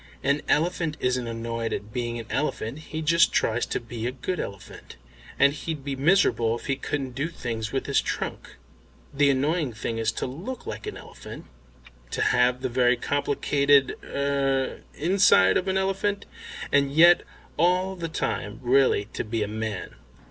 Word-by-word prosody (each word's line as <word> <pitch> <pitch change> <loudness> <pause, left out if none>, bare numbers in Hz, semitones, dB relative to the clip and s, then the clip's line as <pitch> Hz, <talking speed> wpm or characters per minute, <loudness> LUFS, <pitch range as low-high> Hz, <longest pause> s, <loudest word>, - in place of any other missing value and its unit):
An 140 +2 +2
elephant 165 -1 +1
isn't 125 -1 0
annoyed 115 0 -3
at 105 +1 -6
being 120 -1 -2
an 115 - -6
elephant; 140 -3 -2
he 155 0 -6
just 170 +2 +4
tries 120 +2 +1
to - - -2
be 115 0 -5
a - - -1
good 150 +8 -4
elephant, 100 -1 -8 0.4
and 140 0 +5
he'd 150 -1 -5
be 140 -1 -2
miserable 135 - +3
if - - -12
he 135 - 0
couldn't 135 -1 -3
do 140 +5 -2
things 115 -8 -4
with 135 - -2
his 140 - +2
trunk. - - -5 0.6
The 145 0 +4
annoying 145 0 +1
thing 115 +1 -4
is 110 0 +1
to - - -3
look 180 - -6
like - - -6
an - - -5
elephant, - - -11 0.6
to - - -3
have 125 +1 +2
the - - +1
very 125 0 +3
complicated 140 0 +2
er 140 -1 -1
inside 165 - +4
of 185 - 0
an 190 0 +1
elephant, 195 +1 -1 0.5
and 140 -1 +3
yet 170 +4 +7 0.3
all 180 +4 +2
the 170 -2 -5
time 105 -8 -3
really 130 -4 +3
to - - -2
be 110 0 -2
a - - -3
man." 110 -2 -4
135 Hz, 170 wpm, -25 LUFS, 120-155 Hz, 0.6 s, yet